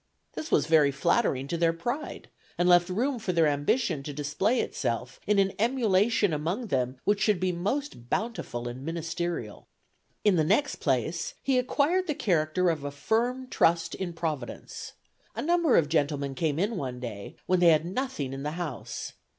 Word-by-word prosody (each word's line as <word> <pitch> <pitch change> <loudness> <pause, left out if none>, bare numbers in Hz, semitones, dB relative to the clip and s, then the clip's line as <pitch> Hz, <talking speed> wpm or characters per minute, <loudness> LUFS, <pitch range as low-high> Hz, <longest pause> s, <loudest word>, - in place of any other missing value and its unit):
This 315 - -5
was - - +3
very 155 -3 +5
flattering 135 -1 +1
to 170 - -1
their 165 0 +3
pride, 240 - -4 0.3
and 175 - +2
left 175 0 +5
room 245 +7 0
for 200 -4 -2
their 165 -2 +4
ambition 150 - +1
to 145 - -6
display 150 - 0
itself 120 +2 -2
in 210 0 +3
an 195 -1 +3
emulation 220 -4 +2
among 175 +10 -2
them 130 -2 0
which 205 0 +1
should 200 -2 +3
be 185 0 +1
most 185 - -3
bountiful 200 - -2
and 125 +2 -6
ministerial. 165 - -4 0.6
"In 205 -4 +4
the 160 - +3
next 285 - +2
place, 155 +4 -1
he 265 -2 +3
acquired 300 +8 +1
the 300 - -1
character 175 -2 +1
of 145 -3 -4
firm 240 - 0
trust 165 -8 +2
in 180 -3 -4
Providence. 155 -7 -5 0.4
A - - -2
number 340 -3 +3
of 155 - +3
gentlemen 145 -2 0
came 150 +2 -1
in 205 +5 0
one 130 -6 -4
day, 110 -5 -7
when 185 -1 +2
they 175 -1 +6
had 155 0 +4
nothing 185 - -3
in 135 - -5
the 150 +2 -3
house. 160 -9 -5
170 Hz, 175 wpm, -28 LUFS, 145-220 Hz, 0.6 s, they